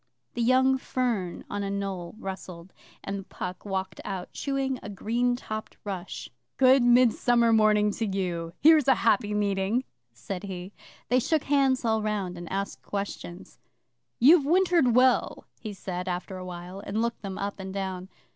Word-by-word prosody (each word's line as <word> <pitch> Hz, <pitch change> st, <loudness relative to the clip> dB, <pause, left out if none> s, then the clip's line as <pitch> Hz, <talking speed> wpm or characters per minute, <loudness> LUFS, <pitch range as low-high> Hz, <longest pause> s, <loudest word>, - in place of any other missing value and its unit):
The 240 Hz, -, -2 dB
young 260 Hz, +2 st, +4 dB
fern 235 Hz, -10 st, -2 dB
on 205 Hz, -, -4 dB
a 200 Hz, -, -2 dB
knoll 195 Hz, -3 st, -4 dB
rustled, 185 Hz, -3 st, -8 dB, 0.3 s
and 195 Hz, -1 st, -5 dB
Puck 180 Hz, 0 st, -6 dB
walked 190 Hz, -1 st, -4 dB
out, 190 Hz, -3 st, -5 dB
chewing 270 Hz, -2 st, -2 dB
a -, -, -8 dB
green 235 Hz, +5 st, 0 dB
topped 215 Hz, -3 st, -7 dB
rush. 195 Hz, -3 st, -5 dB, 0.3 s
'Good 260 Hz, 0 st, +6 dB
Midsummer 240 Hz, -1 st, +4 dB
Morning 210 Hz, -1 st, +4 dB
to 225 Hz, +2 st, -2 dB
you! 175 Hz, -4 st, -2 dB
Here's 310 Hz, -2 st, +6 dB
a 270 Hz, -, +6 dB
happy 210 Hz, -2 st, +3 dB
meeting,' 200 Hz, +3 st, 0 dB, 0.3 s
said 115 Hz, -, -6 dB
he. 185 Hz, 0 st, -7 dB, 0.4 s
They 250 Hz, -, +4 dB
shook 310 Hz, +4 st, +1 dB
hands 270 Hz, -3 st, +2 dB
all 220 Hz, -1 st, +2 dB
round, 205 Hz, -4 st, -2 dB
and 175 Hz, -1 st, -8 dB
asked 195 Hz, +1 st, -3 dB
questions. 200 Hz, -3 st, -6 dB, 0.6 s
'You've 295 Hz, +5 st, +7 dB
wintered 335 Hz, -5 st, +3 dB
well,' 255 Hz, 0 st, +3 dB
he 215 Hz, -, -6 dB
said 185 Hz, -2 st, -5 dB
after 180 Hz, +1 st, -3 dB
a 185 Hz, -, -7 dB
while, 180 Hz, +1 st, -8 dB
and 200 Hz, +1 st, -3 dB
looked 235 Hz, 0 st, -2 dB
them 195 Hz, -2 st, -5 dB
up 200 Hz, 0 st, -4 dB
and 190 Hz, 0 st, -6 dB
down. 190 Hz, -1 st, -4 dB
205 Hz, 160 wpm, -27 LUFS, 190-245 Hz, 0.6 s, You've